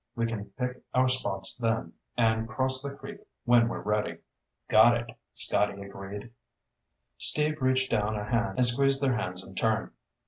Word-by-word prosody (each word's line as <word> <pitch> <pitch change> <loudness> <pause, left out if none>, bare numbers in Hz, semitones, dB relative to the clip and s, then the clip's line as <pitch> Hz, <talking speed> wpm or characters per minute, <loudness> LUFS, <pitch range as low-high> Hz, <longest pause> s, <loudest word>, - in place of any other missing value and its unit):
We 115 -1 -1
can 115 -3 -4
pick 125 0 -4
our 130 0 +3
spots 95 -7 +1
then 115 -2 -2 0.2
and 110 -1 +1
cross 130 +3 +2
the 140 0 -5
creek - - -10 0.3
when 120 -1 +4
we're 120 - -5
ready." 105 0 -1 0.5
"Got 115 +2 +5
it," 120 0 -7 0.2
Scotty 100 -1 +2
agreed. 100 +3 -9 0.9
Steve 150 0 +4
reached 130 0 +1
down 110 -1 0
a 105 - -4
hand 115 +2 -2
and 125 - +4
squeezed 135 +3 +2
their 130 -2 +2
hands 90 -5 -4
in 95 - -13
turn. 110 +2 -1
115 Hz, 165 wpm, -28 LUFS, 105-130 Hz, 0.9 s, Got